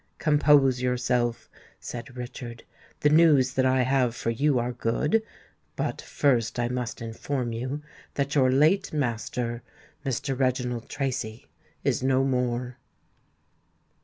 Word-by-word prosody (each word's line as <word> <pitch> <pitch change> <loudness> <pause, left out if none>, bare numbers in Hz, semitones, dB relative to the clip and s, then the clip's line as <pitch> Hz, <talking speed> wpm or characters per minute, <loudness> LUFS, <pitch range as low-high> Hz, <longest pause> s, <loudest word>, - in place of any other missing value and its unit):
"Compose 145 -4 +4
yourself," 125 -1 0 0.3
said 125 +1 -8
Richard; 120 -1 -7 0.4
"the 150 - +4
news 150 -5 +5
that 130 0 +2
I 130 0 +3
have 130 -2 +1
for 115 - -1
you 140 +3 +2
are 120 +1 0
good. 150 - +1 0.5
But - - -2
first 120 -5 +1
I 120 0 0
must 125 -3 -4
inform 120 +2 -3
you 130 +6 -4 0.3
that 140 0 -1
your 130 -3 +4
late 160 +9 +3
master, 120 -3 -2 0.4
Mr. 135 0 -2
Reginald 125 -2 -1
Tracy, 125 -5 -3 0.4
is - - +1
no 130 0 +2
more." 125 -1 -1
125 Hz, 125 wpm, -26 LUFS, 120-140 Hz, 0.5 s, news